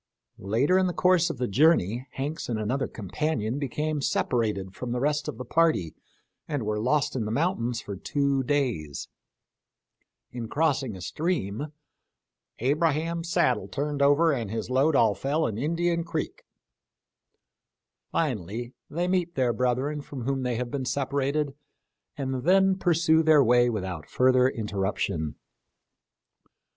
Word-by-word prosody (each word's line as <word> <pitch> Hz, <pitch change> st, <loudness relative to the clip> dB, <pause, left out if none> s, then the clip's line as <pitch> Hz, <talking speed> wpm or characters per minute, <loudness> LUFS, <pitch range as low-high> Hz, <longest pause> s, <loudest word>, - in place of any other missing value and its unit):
Later 125 Hz, -, +2 dB
in 185 Hz, -, +2 dB
the 180 Hz, -, -2 dB
course 180 Hz, -2 st, +3 dB
of -, -, -4 dB
the 125 Hz, 0 st, -1 dB
journey. 125 Hz, -, +3 dB
Hanks 145 Hz, +3 st, -4 dB
and 115 Hz, -, -1 dB
another 120 Hz, +6 st, -1 dB
companion 115 Hz, -, -2 dB
became 150 Hz, +2 st, -2 dB
separated 105 Hz, -8 st, 0 dB
from 120 Hz, +2 st, -4 dB
the 125 Hz, -, -1 dB
rest 145 Hz, +1 st, 0 dB
of -, -, -5 dB
the 125 Hz, -, -6 dB
party 155 Hz, -, +2 dB, 0.5 s
and 145 Hz, -6 st, -2 dB
were 105 Hz, 0 st, -1 dB
lost 130 Hz, +6 st, +1 dB
in 120 Hz, -4 st, -1 dB
the 105 Hz, -, -3 dB
mountains 120 Hz, -5 st, 0 dB
for 100 Hz, -, -6 dB
two 140 Hz, +6 st, 0 dB
days; 120 Hz, -, -1 dB, 1.2 s
in 120 Hz, -2 st, -5 dB
crossing 140 Hz, -5 st, 0 dB
a 95 Hz, -, -9 dB
stream 145 Hz, -, -2 dB, 0.5 s
" -, -, -60 dB
Abraham's 165 Hz, +2 st, 0 dB
saddle -, -, +2 dB
turned 145 Hz, 0 st, -3 dB
over 145 Hz, +4 st, +5 dB
and 115 Hz, -6 st, -3 dB
his 110 Hz, +3 st, -4 dB
load 140 Hz, +4 st, +3 dB
all 115 Hz, -5 st, +4 dB
fell 145 Hz, +8 st, 0 dB
in 110 Hz, -1 st, -2 dB
Indian 170 Hz, +4 st, 0 dB
creek 160 Hz, -2 st, -4 dB, 0.8 s
"; -, -, -57 dB
finally 120 Hz, -, -2 dB, 0.2 s
they 175 Hz, +4 st, -1 dB
meet 180 Hz, -2 st, 0 dB
their 125 Hz, -3 st, +2 dB
brethren 125 Hz, +5 st, 0 dB
from 140 Hz, -3 st, -7 dB
whom 135 Hz, +1 st, -1 dB
they 125 Hz, -2 st, -1 dB
have 120 Hz, +1 st, -3 dB
been 140 Hz, -2 st, -2 dB
separated 140 Hz, +2 st, -1 dB, 0.6 s
and 130 Hz, -2 st, -2 dB
then 190 Hz, +4 st, +4 dB
pursue 165 Hz, -3 st, +3 dB
their 155 Hz, -3 st, +5 dB
way 120 Hz, 0 st, +4 dB
without 95 Hz, -8 st, -4 dB
further 130 Hz, 0 st, +4 dB
interruption. 100 Hz, -, -2 dB
135 Hz, 145 wpm, -27 LUFS, 115-155 Hz, 1.2 s, over